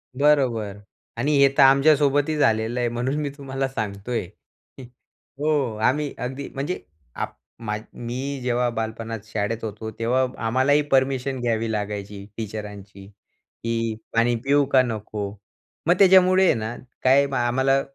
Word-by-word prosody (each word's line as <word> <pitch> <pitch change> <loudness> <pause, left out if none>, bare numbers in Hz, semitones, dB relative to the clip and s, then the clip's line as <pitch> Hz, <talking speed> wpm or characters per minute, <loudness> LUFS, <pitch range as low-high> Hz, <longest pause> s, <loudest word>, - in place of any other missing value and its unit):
बरोबर, 130 -8 +2 0.4
आणि 140 +6 0
हे 140 - +8
तर 140 - +8
आमच्यासोबतही 145 +2 +4
झालेलं 115 -2 +1
आहे, 120 -1 +1
म्हणून 120 +4 -2
मी 145 - -2
तुम्हाला 135 -1 -3
सांगतोय. 110 -3 -4 1.1
हो. 145 -6 +1
आम्ही 140 +6 +1
अगदी, 130 +3 -5
म्हणजे 145 +7 -3 0.4
आपण, 105 -2 -6 0.2
मी 135 +4 -3
जेव्हा 125 0 +1
बालपणात 115 0 -4
शाळेत 110 +1 -3
होतो, 110 0 -5
तेव्हा 125 +3 +2 0.2
आम्हालाही 130 +5 +3
परमिशन 135 0 +1
घ्यावी 115 -1 0
लागायची 105 -1 -4
टीचरांची, 105 -3 -7
की 115 +2 -5 0.2
पाणी 120 +1 +3
पिऊ 140 +1 +4
का 130 - +6
नको. 105 -3 -4 0.6
मग 175 - +6
त्याच्यामुळे 190 -1 +6
आहे - - +5
ना, 110 +1 -4 0.3
काय, 135 +2 +5
आम्हाला 130 +3 +2
120 Hz, 125 wpm, -23 LUFS, 110-135 Hz, 1.1 s, हे